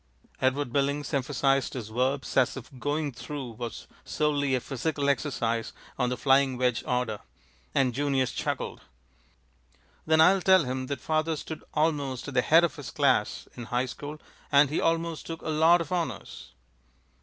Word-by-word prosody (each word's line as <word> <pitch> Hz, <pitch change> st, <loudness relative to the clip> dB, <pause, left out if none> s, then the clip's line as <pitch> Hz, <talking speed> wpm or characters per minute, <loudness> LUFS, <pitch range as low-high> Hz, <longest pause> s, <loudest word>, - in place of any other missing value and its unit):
Edward 130 Hz, -1 st, +1 dB
Billings 140 Hz, +1 st, 0 dB
emphasized 135 Hz, 0 st, +1 dB
his 115 Hz, -4 st, -5 dB
verbs 130 Hz, +4 st, -1 dB
as 130 Hz, 0 st, +3 dB
if 130 Hz, -1 st, -9 dB
"going 145 Hz, +2 st, -1 dB
through" 135 Hz, 0 st, -6 dB
was 115 Hz, 0 st, -7 dB, 0.2 s
solely 145 Hz, -3 st, 0 dB
a -, -, +1 dB
physical 140 Hz, +3 st, -2 dB
exercise 115 Hz, -5 st, -1 dB, 0.3 s
on 125 Hz, -1 st, +2 dB
the 125 Hz, -, -2 dB
flying 135 Hz, -1 st, +3 dB
wedge 125 Hz, -3 st, +1 dB
order; 125 Hz, -4 st, -1 dB, 0.6 s
and 130 Hz, -3 st, +3 dB
Junius 135 Hz, -2 st, 0 dB
chuckled. -, -, -3 dB, 1.3 s
"Then 160 Hz, 0 st, +4 dB
I'll 185 Hz, +4 st, +6 dB
tell 185 Hz, -2 st, +5 dB
him 130 Hz, 0 st, -3 dB
that 140 Hz, -, -4 dB
father 155 Hz, 0 st, 0 dB
stood 155 Hz, +1 st, -7 dB
almost 145 Hz, -5 st, 0 dB
at 145 Hz, -, -6 dB
the 125 Hz, -, +4 dB
head 165 Hz, +6 st, +5 dB
of 170 Hz, -, 0 dB
his 140 Hz, -5 st, -7 dB
class 130 Hz, -7 st, +1 dB
in 120 Hz, -, -7 dB
high 125 Hz, +2 st, 0 dB
school, 145 Hz, +4 st, -7 dB, 0.3 s
and 140 Hz, 0 st, +5 dB
he 155 Hz, -, 0 dB
almost 165 Hz, -1 st, -1 dB
took 165 Hz, -1 st, -6 dB
a -, -, -4 dB
lot 160 Hz, +3 st, +5 dB
of 165 Hz, -, -6 dB
honors." 175 Hz, -2 st, -4 dB
140 Hz, 165 wpm, -28 LUFS, 125-155 Hz, 1.3 s, I'll